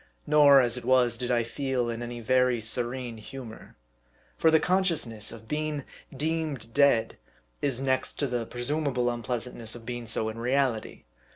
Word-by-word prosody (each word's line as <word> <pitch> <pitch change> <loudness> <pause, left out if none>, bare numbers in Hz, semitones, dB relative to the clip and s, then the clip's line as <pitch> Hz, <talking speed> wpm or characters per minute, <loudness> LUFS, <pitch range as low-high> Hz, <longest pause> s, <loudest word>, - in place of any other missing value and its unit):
Nor, 145 -2 +7
as 120 -1 +1
it 125 - -6
was, 125 -1 +3
did 125 +1 -4
I 120 -2 +2
feel 130 0 -2
in 115 0 -4
any 120 0 -6
very 125 +1 +2
serene 120 +2 0
humor. 115 0 -10 0.6
For 160 - +3
the 160 0 +5
consciousness 165 - 0
of 110 -1 -11
being 150 0 -2 0.3
deemed 145 -5 -3
dead, 140 -5 +3 0.4
is 135 -4 0
next 130 -1 0
to 145 - +1
the 120 -3 -2
presumable 125 -1 -1
unpleasantness 120 -1 -3
of 115 -1 -11
being 120 -1 -5
so 110 0 +1
in 110 +1 -7
reality. 125 -2 -1
125 Hz, 160 wpm, -27 LUFS, 115-140 Hz, 0.6 s, Nor